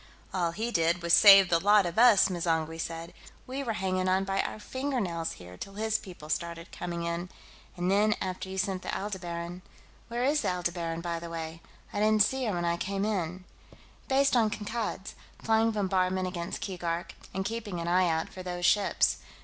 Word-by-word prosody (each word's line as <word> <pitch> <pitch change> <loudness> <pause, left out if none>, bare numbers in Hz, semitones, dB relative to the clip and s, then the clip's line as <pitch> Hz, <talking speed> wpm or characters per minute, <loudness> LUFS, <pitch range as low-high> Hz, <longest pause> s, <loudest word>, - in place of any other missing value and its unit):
"All 175 -3 +1
he 225 +6 -3
did 170 -2 +1
was 170 0 +1
save 195 -2 +9
the 170 - +4
lot 205 +1 +5
of 175 +4 -1
us!" 235 -5 +7
M'zangwe 165 -3 -1
said. 165 0 -6 0.3
"We 265 +2 -4
were 240 -5 -2
hanging 185 -1 0
on 190 +1 +2
by 195 0 0
our - - -5
fingernails 215 -10 -2
here 90 0 -12
till 195 - -8
his 220 +1 0
people 175 -6 -11
started 170 +2 -3
coming 170 -1 -4
in. 170 +1 -3 0.5
And 175 +1 0
then, 210 +2 +3
after 185 0 -4
you 190 - -6
sent 190 -1 -1
the - - -7
Aldebaran...." 175 -3 -5 0.5
"Where 240 +1 -2
is 290 +3 +2
the - - 0
Aldebaran, 175 -2 -2
by 170 -1 -3
the 170 0 -7
way? 165 0 -6 0.3
I - - -2
didn't 215 0 +5
see 265 +4 -1
her 215 - 0
when 175 0 -1
I 170 0 +1
came 195 +2 -2
in." 185 -4 -2 0.6
"Based 275 0 +3
on 225 -3 +4
Kankad's, 210 -2 -4 0.3
flying 225 0 +3
bombardment 185 -3 0
against 175 -1 -5
Keegark, 175 -2 -3 0.2
and 190 +1 -3
keeping 210 -4 -4
an 170 - -4
eye 180 0 +3
out 160 0 0
for 185 - -9
those 180 -1 -3
ships. 205 +2 +3
185 Hz, 190 wpm, -29 LUFS, 170-210 Hz, 0.6 s, save